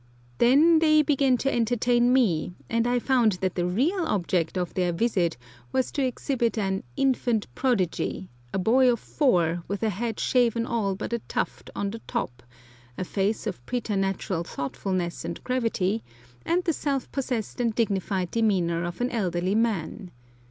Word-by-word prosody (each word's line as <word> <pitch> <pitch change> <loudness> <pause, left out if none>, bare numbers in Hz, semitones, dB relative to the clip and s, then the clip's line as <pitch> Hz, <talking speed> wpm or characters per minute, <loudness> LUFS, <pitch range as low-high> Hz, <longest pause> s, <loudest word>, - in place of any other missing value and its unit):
Then 305 +7 +6
they 310 -1 +5
began 275 -3 +3
to 275 +3 0
entertain 240 +1 +2
me, 180 -10 +2 0.2
and 230 0 +2
I 245 0 +2
found 245 -4 +3
that 185 0 -2
the 175 -1 -1
real 295 - +1
object 180 - 0
of 180 -1 -2
their 180 -2 +1
visit 175 - 0 0.3
was 260 - 0
to 280 - -1
exhibit 245 -2 -1
an 195 -2 0 0.2
"infant 245 -5 +1
prodigy," 190 - -1 0.2
a - - -2
boy 245 +7 +4
of 235 - -1
four, 175 - +1
with 200 +2 -3
a 220 - +2
head 225 +3 -3
shaven 235 -2 +2
all 215 -5 -1
but 215 - -5
a 235 - 0
tuft - - -3
on 200 0 -2
the 225 - -6
top, 120 -1 -3 0.6
a - - -2
face 200 +4 -1
of 180 - -4
preternatural 195 -6 -1
thoughtfulness 175 +4 -3
and 170 - -6
gravity, 225 -5 0 0.4
and 350 +2 +2
the 330 - +1
self 280 -3 -2
possessed 250 -3 -3
and 230 -3 0
dignified 195 -5 0
demeanour 180 -7 +1
of 175 +5 -5
an 245 - 0
elderly 185 -4 0
man. 210 -3 -1
220 Hz, 160 wpm, -26 LUFS, 185-250 Hz, 0.6 s, Then